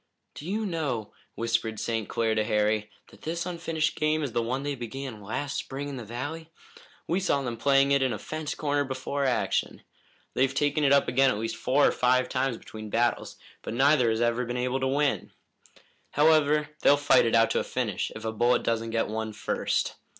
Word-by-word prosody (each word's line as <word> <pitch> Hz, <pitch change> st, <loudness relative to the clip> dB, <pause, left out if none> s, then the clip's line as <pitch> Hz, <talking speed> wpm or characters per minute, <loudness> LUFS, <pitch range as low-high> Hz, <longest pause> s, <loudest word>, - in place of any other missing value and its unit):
"Do 150 Hz, -, -9 dB
you 215 Hz, +2 st, -1 dB
know," 145 Hz, -, -3 dB, 0.2 s
whispered 115 Hz, -1 st, -1 dB
St. 115 Hz, -2 st, -2 dB
Clair 115 Hz, -1 st, +1 dB
to 110 Hz, 0 st, +1 dB
Harry, 105 Hz, -1 st, +1 dB, 0.2 s
"that -, -, -18 dB
this 170 Hz, +2 st, -3 dB
unfinished 165 Hz, -3 st, -1 dB
game 155 Hz, 0 st, +1 dB
is 140 Hz, -, -3 dB
the 120 Hz, -, 0 dB
one 130 Hz, +4 st, -2 dB
they 145 Hz, 0 st, -2 dB
began 125 Hz, -2 st, -6 dB
last 135 Hz, +8 st, -3 dB
spring 140 Hz, +2 st, -5 dB
in 140 Hz, -2 st, -6 dB
the 120 Hz, -, -6 dB
valley? 145 Hz, +9 st, -6 dB, 0.6 s
We 175 Hz, +3 st, 0 dB
saw 140 Hz, -7 st, +1 dB
them 120 Hz, -2 st, -3 dB
playing 135 Hz, +3 st, +3 dB
it 140 Hz, -1 st, +4 dB
in 130 Hz, -1 st, +2 dB
a 110 Hz, -, -2 dB
fence 155 Hz, +3 st, -5 dB
corner 145 Hz, -1 st, 0 dB
before 135 Hz, +1 st, -3 dB
action. 110 Hz, -7 st, 0 dB, 0.5 s
They've 135 Hz, +1 st, +1 dB
taken 145 Hz, +1 st, +1 dB
it 140 Hz, -, +4 dB
up 140 Hz, 0 st, +4 dB
again 135 Hz, +1 st, +4 dB
at 115 Hz, -, 0 dB
least 115 Hz, +1 st, -3 dB
four 140 Hz, +3 st, +2 dB
or -, -, +4 dB
five 125 Hz, +1 st, +2 dB
times 130 Hz, -2 st, 0 dB
between 110 Hz, -1 st, -9 dB
battles, 120 Hz, +3 st, 0 dB, 0.2 s
but -, -, -5 dB
neither 135 Hz, -2 st, +4 dB
has 110 Hz, +1 st, 0 dB
ever 120 Hz, +1 st, +1 dB
been 120 Hz, 0 st, -3 dB
able 125 Hz, +1 st, 0 dB
to 130 Hz, -, 0 dB
win. 140 Hz, +2 st, 0 dB, 0.8 s
However, 150 Hz, 0 st, +4 dB
they'll 145 Hz, -, +6 dB
fight 145 Hz, -4 st, +4 dB
it 115 Hz, -, +2 dB
out 115 Hz, 0 st, +4 dB
to -, -, +2 dB
a -, -, -1 dB
finish, 110 Hz, -7 st, -2 dB
if 110 Hz, -, -8 dB
a 110 Hz, -, -1 dB
bullet 120 Hz, +2 st, +2 dB
doesn't 115 Hz, 0 st, -1 dB
get 115 Hz, 0 st, 0 dB
one 110 Hz, 0 st, -4 dB
first. -, -, -1 dB
130 Hz, 205 wpm, -27 LUFS, 115-145 Hz, 0.8 s, they'll